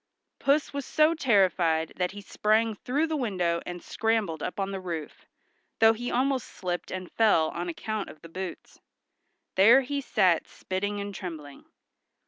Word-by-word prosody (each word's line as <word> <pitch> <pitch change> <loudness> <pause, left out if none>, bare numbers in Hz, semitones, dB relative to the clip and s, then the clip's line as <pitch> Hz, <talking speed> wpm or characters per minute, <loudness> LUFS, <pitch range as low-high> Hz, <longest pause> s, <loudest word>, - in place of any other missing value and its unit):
Puss 285 +1 +2
was 280 0 -3
so 310 +4 +3
terrified 185 - +2
that 180 -1 0
he 205 +2 -9
sprang 215 +2 +1
through 265 +9 -1
the 320 -1 -2
window 180 - 0
and 175 0 -6
scrambled 220 -8 -1
up - - -3
the 195 -1 -3
roof, 170 -5 -6 0.5
though 225 0 +6
he 245 +2 -4
almost 260 0 0
slipped 180 -1 -4
and 185 -1 -6
fell 205 -8 +3
on 175 +1 -4
account 215 +4 -4
of 155 - -12
the - - -9
boots. 185 +1 -7 0.7
There 230 +8 +7
he 280 +2 -3
sat 180 -9 +2
spitting 205 +2 -3
and 200 0 -5
trembling. 160 -7 -8
200 Hz, 155 wpm, -27 LUFS, 175-235 Hz, 0.7 s, There